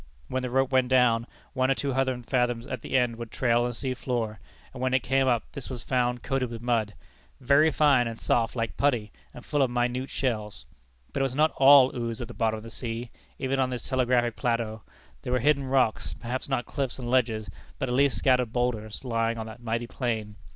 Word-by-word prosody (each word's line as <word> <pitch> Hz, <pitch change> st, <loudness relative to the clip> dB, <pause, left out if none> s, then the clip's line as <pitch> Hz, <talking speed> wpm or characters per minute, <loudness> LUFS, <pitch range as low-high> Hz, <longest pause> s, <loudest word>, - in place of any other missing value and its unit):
When 130 Hz, -, -1 dB
the 125 Hz, -, -3 dB
rope 135 Hz, +1 st, +1 dB
went 130 Hz, -1 st, +3 dB
down, 125 Hz, -2 st, +3 dB, 0.3 s
one 130 Hz, -1 st, +1 dB
or 135 Hz, -, +3 dB
two 140 Hz, -2 st, -2 dB
hundred 130 Hz, -2 st, -1 dB
fathoms 120 Hz, -1 st, 0 dB
at -, -, -5 dB
the -, -, 0 dB
end 120 Hz, -2 st, +1 dB
would 115 Hz, -1 st, -7 dB
trail 120 Hz, -1 st, +2 dB
on 120 Hz, -, +1 dB
the 120 Hz, -, -4 dB
sea 130 Hz, +1 st, -3 dB
floor; 115 Hz, -4 st, -3 dB, 0.3 s
and 125 Hz, -, -8 dB
when 130 Hz, 0 st, +1 dB
it 130 Hz, -, +1 dB
came 135 Hz, 0 st, +2 dB
up, 120 Hz, -3 st, +2 dB
this 140 Hz, -3 st, -8 dB
was 125 Hz, -3 st, -6 dB
found 125 Hz, -1 st, 0 dB
coated 135 Hz, -2 st, -1 dB
with 115 Hz, -1 st, -6 dB
mud, 115 Hz, -3 st, 0 dB, 0.4 s
"very 140 Hz, +5 st, +4 dB
fine 140 Hz, -6 st, +3 dB
and 115 Hz, -1 st, -6 dB
soft 115 Hz, 0 st, +1 dB
like 115 Hz, -2 st, -2 dB
putty, 120 Hz, -7 st, +1 dB, 0.2 s
and 125 Hz, -, -12 dB
full 145 Hz, -1 st, 0 dB
of 130 Hz, -, +3 dB
minute 125 Hz, +2 st, -1 dB
shells." 110 Hz, -6 st, -3 dB, 0.5 s
But -, -, -1 dB
it 135 Hz, -, +2 dB
was 130 Hz, -, -8 dB
not 155 Hz, +2 st, +3 dB
all 135 Hz, -1 st, +7 dB
ooze 115 Hz, -2 st, -3 dB
at 120 Hz, -, -5 dB
the 120 Hz, -, -9 dB
bottom 110 Hz, -1 st, 0 dB
of 110 Hz, -, -9 dB
the 115 Hz, -, -10 dB
sea, 115 Hz, 0 st, -5 dB, 0.3 s
even 135 Hz, 0 st, -1 dB
on 130 Hz, -1 st, +2 dB
this 125 Hz, -2 st, -5 dB
telegraphic 125 Hz, -2 st, +1 dB
plateau. 115 Hz, -2 st, -1 dB, 0.4 s
There 125 Hz, -, -3 dB
were -, -, +4 dB
hidden 140 Hz, +2 st, +2 dB
rocks 130 Hz, -4 st, +1 dB
perhaps 125 Hz, +3 st, -4 dB
not 135 Hz, -3 st, 0 dB
cliffs 135 Hz, -4 st, -3 dB
and 125 Hz, -2 st, -6 dB
ledges, 115 Hz, -4 st, +1 dB, 0.3 s
but 135 Hz, -, -2 dB
at 125 Hz, -, -2 dB
least 140 Hz, +1 st, +3 dB
scattered 125 Hz, -3 st, +2 dB
boulders, 115 Hz, -3 st, -2 dB
lying 115 Hz, -1 st, 0 dB
on 110 Hz, -, -4 dB
that 110 Hz, +2 st, -10 dB
mighty 115 Hz, 0 st, -2 dB
plain. 110 Hz, -4 st, -3 dB
125 Hz, 225 wpm, -27 LUFS, 115-130 Hz, 0.5 s, all